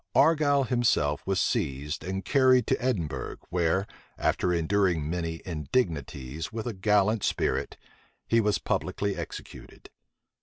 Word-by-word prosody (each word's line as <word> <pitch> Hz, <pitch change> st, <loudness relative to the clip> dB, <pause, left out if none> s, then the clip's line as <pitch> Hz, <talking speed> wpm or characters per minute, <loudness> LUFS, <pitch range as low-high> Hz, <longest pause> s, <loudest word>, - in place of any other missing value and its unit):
Argyle 145 Hz, -3 st, +4 dB
himself 115 Hz, -, +1 dB
was 95 Hz, -1 st, +1 dB
seized 75 Hz, -, -1 dB
and 95 Hz, +1 st, -4 dB
carried 130 Hz, -3 st, +4 dB
to -, -, 0 dB
Edinburgh, 85 Hz, -, -2 dB
where, 90 Hz, +2 st, +1 dB, 0.3 s
after 90 Hz, -, +1 dB
enduring 85 Hz, -2 st, +1 dB
many 85 Hz, -1 st, -3 dB
indignities 80 Hz, -, -2 dB
with 110 Hz, -1 st, -5 dB
a 120 Hz, -, -2 dB
gallant 105 Hz, +2 st, +2 dB
spirit, -, -, -1 dB, 0.5 s
he 115 Hz, 0 st, +3 dB
was 105 Hz, -1 st, +2 dB
publicly 100 Hz, -1 st, -2 dB
executed. 85 Hz, -3 st, -9 dB
95 Hz, 120 wpm, -28 LUFS, 80-115 Hz, 0.5 s, Argyle